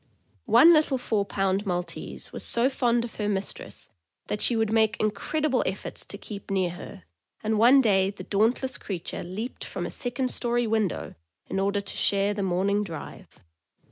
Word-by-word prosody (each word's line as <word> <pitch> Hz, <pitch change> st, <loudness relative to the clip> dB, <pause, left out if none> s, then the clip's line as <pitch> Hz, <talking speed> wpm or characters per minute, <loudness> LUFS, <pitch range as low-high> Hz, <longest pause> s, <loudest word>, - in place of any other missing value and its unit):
One 335 Hz, +2 st, +8 dB
little 305 Hz, -4 st, +3 dB
four 220 Hz, -5 st, 0 dB
pound 195 Hz, 0 st, 0 dB
Maltese 180 Hz, -3 st, -4 dB
was -, -, -4 dB
so 240 Hz, +3 st, +3 dB
fond 240 Hz, -3 st, +1 dB
of 235 Hz, -, -8 dB
her 210 Hz, -1 st, -1 dB
mistress 195 Hz, -1 st, -5 dB, 0.4 s
that 210 Hz, -, -1 dB
she 240 Hz, -, +3 dB
would 220 Hz, -1 st, +1 dB
make 220 Hz, 0 st, +2 dB
incredible 255 Hz, +6 st, 0 dB
efforts 190 Hz, -, -4 dB
to 200 Hz, -, -7 dB
keep 200 Hz, -1 st, -9 dB
near 190 Hz, -3 st, +1 dB
her, 170 Hz, -, -10 dB, 0.4 s
and 215 Hz, 0 st, +1 dB
one 255 Hz, +5 st, +7 dB
day 195 Hz, -5 st, +3 dB
the 200 Hz, -, -8 dB
dauntless 230 Hz, +6 st, +1 dB
creature 180 Hz, -5 st, -5 dB
leaped 205 Hz, +8 st, -6 dB
from -, -, -5 dB
a -, -, -5 dB
second 250 Hz, +1 st, -1 dB
story 240 Hz, 0 st, 0 dB
window 215 Hz, -5 st, -1 dB, 0.3 s
in 195 Hz, -, -3 dB
order 200 Hz, +1 st, +1 dB
to 200 Hz, -, -6 dB
share 200 Hz, 0 st, +2 dB
the 205 Hz, -, -3 dB
morning 195 Hz, +2 st, +1 dB
drive. 165 Hz, -6 st, -9 dB
210 Hz, 175 wpm, -26 LUFS, 195-240 Hz, 0.4 s, One